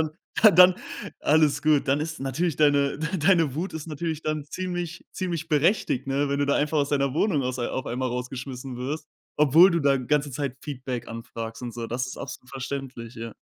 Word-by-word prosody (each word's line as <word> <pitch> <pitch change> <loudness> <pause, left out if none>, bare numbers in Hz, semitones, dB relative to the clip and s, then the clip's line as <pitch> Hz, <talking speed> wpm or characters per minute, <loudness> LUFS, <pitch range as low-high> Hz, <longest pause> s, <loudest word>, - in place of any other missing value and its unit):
dann 155 -1 0 0.4
dann 180 +1 +8 0.5
alles 150 -1 +3
gut. 150 -2 +3
Dann 140 +2 +2
ist 160 +1 -4
natürlich 135 +4 -1
deine 145 -2 +3
deine 165 -3 +2
Wut 175 +6 -3
ist 160 -1 -6
natürlich 160 0 -4
dann 155 -2 -2
ziemlich 175 +1 -5
ziemlich 170 -4 -3
berechtigt, 150 - +2
ne? 140 +1 +1
Wenn 140 - 0
du 145 - +2
da 140 - +2
einfach 150 +1 +1
aus 140 - +1
deiner 140 -2 0
Wohnung 160 -4 +2
aus 130 0 -3
auf 130 +2 -3
einmal 130 +2 -2
rausgeschmissen 125 +1 -5
wirst, 135 +6 -4 0.3
obwohl 150 +6 +7
du 170 - +1
da 140 -2 +3
ganze 145 +3 0
Zeit 135 -1 -3
Feedback 130 -4 -5
anfragst 115 0 -7
und 120 -1 -5
so. 115 0 -5
Das 125 +3 -2
ist 130 - -7
absolut 125 - -8
verständlich, 135 -3 -6
ja. 115 0 -7
145 Hz, 190 wpm, -25 LUFS, 130-160 Hz, 0.5 s, dann